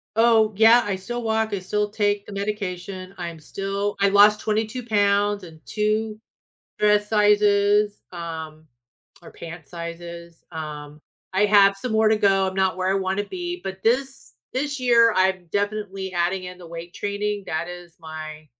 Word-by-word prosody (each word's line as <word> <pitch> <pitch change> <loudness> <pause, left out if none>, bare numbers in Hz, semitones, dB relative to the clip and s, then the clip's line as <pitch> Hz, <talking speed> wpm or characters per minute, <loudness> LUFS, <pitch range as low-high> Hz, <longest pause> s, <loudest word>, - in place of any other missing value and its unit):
Oh, 225 -1 +4
yeah. 230 +2 +7
I 200 -2 -1
still 240 +6 -5
walk. 220 -1 0
I 195 - -1
still 210 +3 -1
take 205 -1 0
the 205 - -9
medication. 195 -2 -4
I'm 170 -2 -6
still 195 +4 -3
I 200 - +5
lost 210 +1 +6
22 220 +3 -2
pounds 205 -2 +2
and 160 -3 -12
2 215 0 -1 0.6
dress 210 0 +3
sizes, 205 -1 +3
um, 160 -2 -7 0.6
or - - -12
pant 165 -2 -10
sizes. 170 +1 -8
Um, 150 -2 -7 0.3
I 195 +2 +3
have 200 -1 +5
some 230 +3 -4
more 220 0 +4
to 220 - +3
go. 195 -2 +3
I'm 190 - -3
not 190 -1 +1
where 185 0 -1
I - - +2
wanna 195 +1 -1
be. 355 - -5
But 190 0 -6
this 260 - 0 0.2
this 285 +2 -2
year, 235 -2 +5
I'm 185 -1 +2
definitely 205 -1 -2
adding 180 +2 0
in 180 0 -8
the 175 - -11
weight 170 +1 -9
training. 205 0 -3
That 160 +2 -3
is 175 -1 -10
my, 155 -1 -8
200 Hz, 165 wpm, -23 LUFS, 175-210 Hz, 0.6 s, yeah